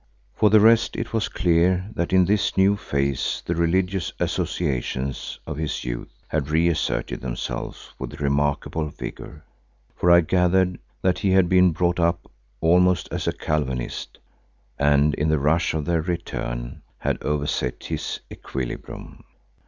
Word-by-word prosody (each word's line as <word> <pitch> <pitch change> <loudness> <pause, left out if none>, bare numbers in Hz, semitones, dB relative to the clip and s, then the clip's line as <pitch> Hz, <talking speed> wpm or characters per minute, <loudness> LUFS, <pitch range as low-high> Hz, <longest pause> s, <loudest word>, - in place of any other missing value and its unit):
For 105 - +3
the 110 +1 +7
rest 115 +2 +5
it 115 - -4
was 110 -2 0
clear 90 +2 +2
that 85 - -2
in 95 -1 +5
his 100 +2 +1
new 95 +1 +5
phase 70 -8 -1
the 85 - 0
religious 90 +2 0
associations 65 -4 -2
of - - -5
his 80 -2 -3
youth - - -4 0.2
had 75 -2 -2
re 80 +2 +3
asserted 85 - -1
themselves - - -5
with 70 - -6
remarkable 75 +2 0
vigour, 75 +1 -8 0.5
for 90 - +1
I 85 0 +8
gathered 90 +1 +2 0.2
that 95 -1 +2
he 100 - +1
had 95 -2 +5
been 90 0 +5
brought 85 +2 0
up 85 0 0 0.3
almost 90 +1 +3
as - - -3
a - - +3
Calvinist, 65 -5 -3 0.6
and 75 +1 +4
in 75 +2 0
the 80 - +3
rush 75 +4 +1
of 75 -2 -2
their 85 -2 +1
return, 75 -8 -4 0.2
had - - -2
overset 75 -4 -2
his - - -4
equilibrium. 65 -3 -6
85 Hz, 145 wpm, -23 LUFS, 75-90 Hz, 0.6 s, I